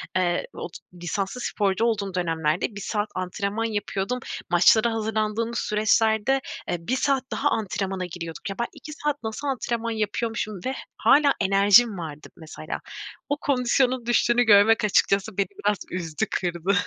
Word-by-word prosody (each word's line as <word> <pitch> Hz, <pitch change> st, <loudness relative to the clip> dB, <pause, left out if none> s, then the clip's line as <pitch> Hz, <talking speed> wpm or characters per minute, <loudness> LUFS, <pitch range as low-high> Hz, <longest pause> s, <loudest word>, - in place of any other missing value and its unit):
eee, 175 Hz, -1 st, +1 dB
ot 175 Hz, -, -7 dB, 0.3 s
lisanslı 195 Hz, +7 st, -3 dB
sporcu 205 Hz, -1 st, 0 dB
olduğum 205 Hz, -4 st, -1 dB
dönemlerde 165 Hz, +2 st, -1 dB
1 200 Hz, -, -6 dB
saat 210 Hz, 0 st, -2 dB
antrenman 200 Hz, +4 st, -2 dB
yapıyordum. 210 Hz, +2 st, -2 dB, 0.3 s
Maçlara 215 Hz, +6 st, +5 dB
hazırlandığımız 220 Hz, +1 st, -1 dB
süreçlerde, 220 Hz, +4 st, +2 dB, 0.3 s
eee, -, -, 0 dB
1 170 Hz, +10 st, -2 dB
saat 270 Hz, 0 st, +1 dB
daha 290 Hz, -, +1 dB
antrenmana 195 Hz, -3 st, -2 dB
giriyorduk. 170 Hz, +1 st, -7 dB
Ya, 195 Hz, -, -4 dB
ben 235 Hz, -, 0 dB
2 305 Hz, -, -10 dB
saat 295 Hz, -2 st, -3 dB
nasıl 220 Hz, +6 st, -4 dB
antrenman 235 Hz, -3 st, -2 dB
yapıyormuşum 215 Hz, -1 st, -2 dB
ve 260 Hz, -, -1 dB, 0.2 s
hâlâ 285 Hz, -2 st, +5 dB
enerjim 200 Hz, +3 st, +5 dB
vardı 155 Hz, -3 st, -7 dB
mesela. 155 Hz, -1 st, -7 dB, 0.5 s
O 285 Hz, -, 0 dB
kondisyonun 255 Hz, -2 st, +1 dB
düştüğünü 240 Hz, 0 st, +3 dB
görmek 215 Hz, +1 st, +5 dB
açıkçası 200 Hz, 0 st, +2 dB
beni 200 Hz, -, +1 dB, 0.2 s
biraz 210 Hz, -, +3 dB
üzdü, 165 Hz, -4 st, -2 dB
kırdı. 175 Hz, +1 st, -1 dB
210 Hz, 140 wpm, -25 LUFS, 185-235 Hz, 0.5 s, Maçlara